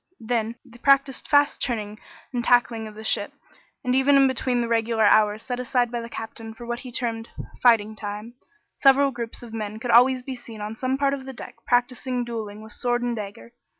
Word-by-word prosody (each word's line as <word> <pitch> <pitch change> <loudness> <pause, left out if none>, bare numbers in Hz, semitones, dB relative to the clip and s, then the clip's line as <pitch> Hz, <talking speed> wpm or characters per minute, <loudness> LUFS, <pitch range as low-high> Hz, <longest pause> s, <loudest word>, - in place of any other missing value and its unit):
Then 230 -1 -1
they 240 -1 -16
practised 275 0 +3
fast 285 -1 +3
turning 215 -4 -2 0.3
and 240 -1 -1
tacking 235 -2 +2
of 215 - -11
the 220 - -9
ship, - - 0 0.5
and 250 - 0
even 265 +2 +4
in 275 -1 +6
between 255 -1 0
the 235 - -1
regular 225 -1 +1
hours 210 +1 +4
set 245 -1 -4
aside 245 -1 0
by 240 -1 -2
the 230 - -8
Captain 225 0 -7
for 240 - -10
what 240 0 -3
he 250 -1 -9
termed 230 -2 -3 0.3
"fighting 220 -3 +4
time," 210 +2 -6 0.4
several 275 0 +5
groups 235 -1 -6
of 230 -2 -10
men 215 -1 -4
could 235 +2 -2
always 250 +2 +5
be 265 - -5
seen 235 -3 -10
on 210 +1 -5
some 255 +3 -1
part 280 0 +2
of 270 -2 -5
the 265 - -6
deck - - -9
practising 245 0 0
dueling 215 -3 -6
with 220 - -12
sword 245 -1 -1
and 240 -1 -1
dagger. 210 +2 -8
240 Hz, 210 wpm, -24 LUFS, 220-255 Hz, 0.5 s, in